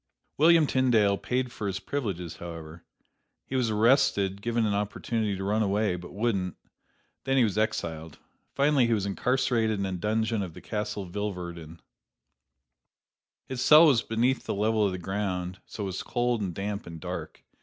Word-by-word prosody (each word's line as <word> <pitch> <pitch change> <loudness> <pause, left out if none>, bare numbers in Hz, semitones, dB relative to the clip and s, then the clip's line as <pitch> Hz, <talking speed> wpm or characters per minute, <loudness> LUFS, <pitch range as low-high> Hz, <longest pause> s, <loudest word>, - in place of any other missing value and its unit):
William 165 0 +6
Tyndale 120 -7 +3
paid 125 +4 -2
for 105 - -4
his 95 0 -2
privileges, 100 - -4
however. 85 -1 -9 0.6
He 135 - -5
was 125 -3 +1
arrested, 105 -4 +2
given 115 0 0
an 105 - +1
opportunity 105 +1 -1
to 95 - -4
run 105 +3 +1
away, 105 -2 +1
but 90 0 -9
wouldn't; 100 -4 -1 0.7
then 135 0 +1
he 130 - +5
was 105 -4 0
exiled. 80 -7 -2 0.4
Finally 140 -3 +3
he 115 - +2
was 100 -2 -1
incarcerated 115 0 +1
in 100 - -1
a 95 - -3
dungeon 110 +4 0
of 90 -4 -6
the - - -9
Castle 105 -2 -4
Vilvoorden. 85 -4 -6 1.6
His 130 -2 -5
cell 155 +2 +8
was 135 -7 +5
beneath 120 +4 0
the - - -2
level 110 +1 +2
of - - -2
the 90 - -4
ground, 90 -1 -3
so 105 - -6
was 95 -1 -3
cold 120 -2 0
and 90 -4 -3
damp 100 0 -4
and 85 -1 -8
dark. - - -6
105 Hz, 165 wpm, -27 LUFS, 95-120 Hz, 1.6 s, cell